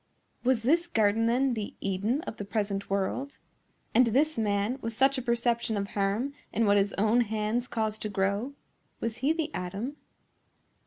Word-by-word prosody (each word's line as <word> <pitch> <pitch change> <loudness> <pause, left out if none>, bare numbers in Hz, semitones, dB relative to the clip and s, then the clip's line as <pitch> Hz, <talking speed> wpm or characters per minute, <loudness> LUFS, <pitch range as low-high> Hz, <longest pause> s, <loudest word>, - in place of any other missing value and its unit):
Was 250 -2 +2
this 335 +7 +3
garden, 225 -5 +2
then, 255 +2 +2
the 215 -3 -4
Eden 200 +8 0
of 230 - -7
the - - -4
present 200 -1 -2
world? 200 +8 -2 0.6
And 250 +1 +6
this 290 +7 +2
man, 210 +3 0
with 230 0 -3
such 270 +1 +4
a - - -3
perception 235 -2 0
of 200 0 -2
harm 205 +7 0 0.2
in 225 +2 +1
what 205 0 +5
his 200 0 +2
own 220 +4 +3
hands 220 +2 -1
caused 220 -2 -2
to 215 - -3
grow,—was 210 +3 -3
he 270 +5 +2
the 320 -1 -2
Adam? 200 +10 -4
225 Hz, 165 wpm, -29 LUFS, 205-255 Hz, 0.6 s, And